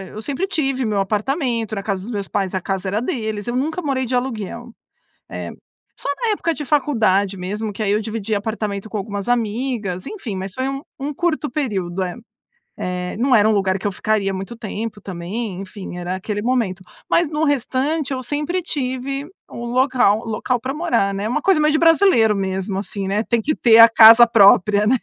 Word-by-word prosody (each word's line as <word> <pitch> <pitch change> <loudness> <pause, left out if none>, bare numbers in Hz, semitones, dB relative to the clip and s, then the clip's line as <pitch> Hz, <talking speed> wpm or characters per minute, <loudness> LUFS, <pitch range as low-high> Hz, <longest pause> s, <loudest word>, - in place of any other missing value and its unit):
eu 215 - -6
sempre 290 - -2
tive 275 -8 -1
o - - 0
meu 205 -2 0
apartamento, 225 - -1
na 200 - -4
casa 195 -3 -2
dos 220 - -8
meus 200 -4 -3
pais. 195 -2 -2
A 185 - -1
casa 195 0 -3
era 210 +4 -1
deles. 220 -5 -3
Eu 240 +1 -3
nunca 315 +7 -1
morei 265 -4 -1
de 250 +1 -1
aluguel. 240 -1 -4 0.6
É - - -6 0.5
só - - -4
na 455 -2 +1
época 335 -5 0
de 295 0 -6
faculdade, 215 -10 +1
mesmo 210 +4 -4
que 205 - -7
aí 200 -1 +1
eu 210 +1 +1
dividi 215 -1 -3
apartamento 210 -1 -3
com 215 - -4
algumas 200 +1 -4
amigas, 225 -5 -1
enfim, 250 - -6
mas 190 0 -5
foi 260 +1 -2
um 275 0 -4 0.2
um 285 +2 -3
curto 310 -2 -1
período, 195 - -2
é. 180 - -4 0.7
Eh, 180 0 -3
não 255 +1 +3
era 210 +1 +4
um - - +3
lugar 195 -2 +1
que 205 - -5
eu 200 - 0
ficaria 200 -1 0
muito 195 +5 -6
tempo 215 -1 -5
também. 190 +2 -5
Enfim, 190 -2 -8
era 175 +1 -3
aquele 205 +2 -4
momento, 225 -7 -1 0.3
mas 335 -3 +3
no 305 +1 -1
restante 285 +1 0
eu 260 -1 -3
sempre 300 +8 -2
tive 275 -2 -3 0.2
um 235 0 -6
local 250 -4 +3
um - - -12
local 245 +3 -1
para 260 +2 -3
morar, 300 -12 +1
né? 205 +2 -2
Uma 295 +5 -1
coisa 380 -5 +3
meio 305 0 +3
de 310 - +2
brasileiro, 330 - +4
mesmo 190 0 -2
assim, 195 0 -4
né? 205 +2 0
Tem 235 -2 +1
que 305 +4 0
ter 230 -2 +5
a 230 0 +11
casa 230 +1 +9
própria, 205 -2 +5
né. 255 +3 +4
225 Hz, 205 wpm, -20 LUFS, 200-265 Hz, 0.7 s, a